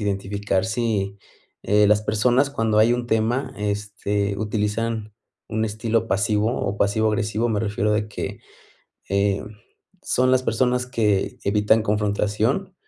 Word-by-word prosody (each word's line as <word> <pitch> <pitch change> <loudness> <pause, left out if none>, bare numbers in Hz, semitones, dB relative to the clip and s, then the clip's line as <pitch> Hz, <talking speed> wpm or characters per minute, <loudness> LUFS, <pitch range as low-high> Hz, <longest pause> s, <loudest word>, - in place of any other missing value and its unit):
identificar 100 -1 -1
si, 105 -3 -1 0.4
eh, 105 +1 +4
las 105 +1 +3
personas 120 +6 +2
cuando 115 -5 +1
hay 110 +2 +5
un 120 0 -2
tema, 120 +4 0
este, 105 -1 -2
utilizan 110 +1 -2 0.4
un 110 0 -1
estilo 110 +1 -1
pasivo, 105 +3 +1
o 100 - -2
pasivo 105 +2 +2
agresivo, 110 +1 0
me 105 -3 0
refiero 105 -1 0
de 105 0 0
que, 105 - -5 0.7
em, 100 +2 -1 0.5
son 130 0 +2
las 130 0 +3
personas 125 +1 +1
que 105 -6 0
evitan 105 +2 +3
confrontación 105 - 0
105 Hz, 130 wpm, -23 LUFS, 105-115 Hz, 0.7 s, hay